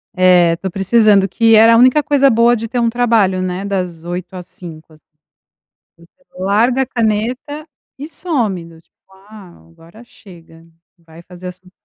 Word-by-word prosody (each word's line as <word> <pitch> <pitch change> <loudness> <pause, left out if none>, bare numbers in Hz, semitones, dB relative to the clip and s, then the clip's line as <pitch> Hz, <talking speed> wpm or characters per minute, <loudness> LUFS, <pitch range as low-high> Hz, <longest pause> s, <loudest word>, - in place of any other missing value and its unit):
É, 180 -2 +3
tô 190 0 -6
precisando, 200 0 +2
que 225 +3 +2
era 225 +1 +6
a - - +4
única 255 +5 +4
coisa 280 -1 +2
boa 235 0 +3
de 225 0 -6
ter 245 - -4
um 235 -1 +1
trabalho, 225 -6 0
né, 185 +1 -4
das 180 -5 -5
8:00 175 +1 -7
às 180 -1 -10
17:00. 160 -3 -13 1.0
Você 170 0 -21 0.3
larga 225 +7 +1
a - - -6
caneta 245 +6 -3 0.3
e 295 - -7
some, 250 - -3
do 165 -1 -17
tipo: - - -47 0.3
"Ah, 190 - -16
agora 170 - -18
chega, 165 -6 -18 0.3
vai 165 0 -17
fazer 180 +1 -12
as 180 - -8
suas", 185 0 -23
195 Hz, 165 wpm, -15 LUFS, 175-235 Hz, 1.0 s, era